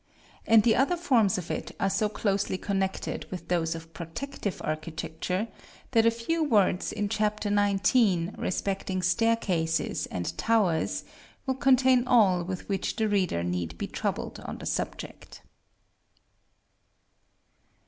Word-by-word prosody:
and 225 -1 +6
the 230 -2 +4
other 285 +7 +2
forms 240 - +3
of 180 -2 -5
it - - -5
are 195 - +2
so 195 +2 +1
closely 200 -2 -1
connected 190 -1 -2
with 185 - -7
those 165 -2 +1
of 165 0 -10
protective 200 - -5
architecture, 160 +5 -3 0.4
that 225 0 +4
a - - +8
few 235 +9 -1
words 205 - +2
in 205 - -2
Chap. 210 0 0
XIX. 205 -2 +2
respecting 190 0 -2
staircases 185 -5 +1
and 90 -1 -4
towers, 205 -8 +1 0.4
will 265 - +1
contain 260 -1 +4
all 195 -8 +4
with 185 +1 -5
which 195 -2 -2
the 220 -1 +1
reader 185 - +1
need 85 -2 -3
be - - -3
troubled - - -3
on - - -7
the - - -9
subject. - - -5
200 Hz, 130 wpm, -28 LUFS, 175-230 Hz, 0.4 s, a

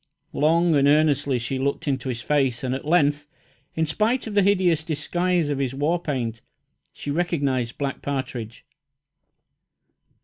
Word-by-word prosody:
Long 165 +3 +3
and 140 -1 +4
earnestly 145 -2 +3
she 125 +3 -3
looked 140 +3 -2
into 135 -2 -1
his 120 -2 -4
face, 135 -4 +1
and 130 -1 -1
at 135 +2 -5
length, 145 -3 +2 0.5
in 160 - +1
spite 215 - 0
of 220 - -6
the 205 - +4
hideous 185 -5 +2
disguise 170 +1 0
of 140 - -2
his 135 -1 -2
war 160 +5 0
paint, 120 -8 -3 0.5
she 145 - -6
recognised 140 -7 -1
Black 140 -1 -3
Partridge. 130 -5 -5
145 Hz, 145 wpm, -24 LUFS, 130-165 Hz, 0.5 s, and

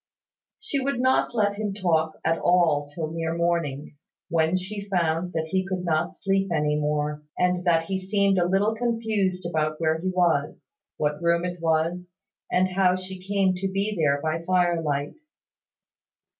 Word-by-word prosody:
She 280 - -2
would 270 -2 -1
not 260 -1 +2
let 205 -2 +1
him 205 -2 -2
talk 160 -5 +1
at 165 +1 +2
all 165 -5 +3
till 155 +1 -5
near 165 0 -2
morning, 165 -4 -1 0.3
when 165 +1 +2
she 200 +2 -6
found 170 -1 0
that 160 -1 -2
he 190 0 +1
could 185 -1 -4
not 160 -1 0
sleep 195 0 0
any 150 -2 +1
more, 150 0 -1 0.2
and 180 0 +1
that 165 -2 +3
he 190 +3 -2
seemed 195 0 +2
a 175 - +2
little 195 +4 +2
confused 220 -6 -1
about 155 -2 -1
where 160 0 +1
he 185 - -1
was, 175 -6 0 0.3
what 150 +1 -1
room 170 +1 +2
it 180 -1 -4
was, 165 +2 0 0.4
and 185 +1 +3
how 185 -1 +3
she 185 0 -7
came 195 0 +1
to 195 +1 -1
be 200 +2 -1
there 145 -5 +2
by 160 +1 -1
fire 175 -1 +2
light. 145 - -2
175 Hz, 170 wpm, -25 LUFS, 160-195 Hz, 0.4 s, all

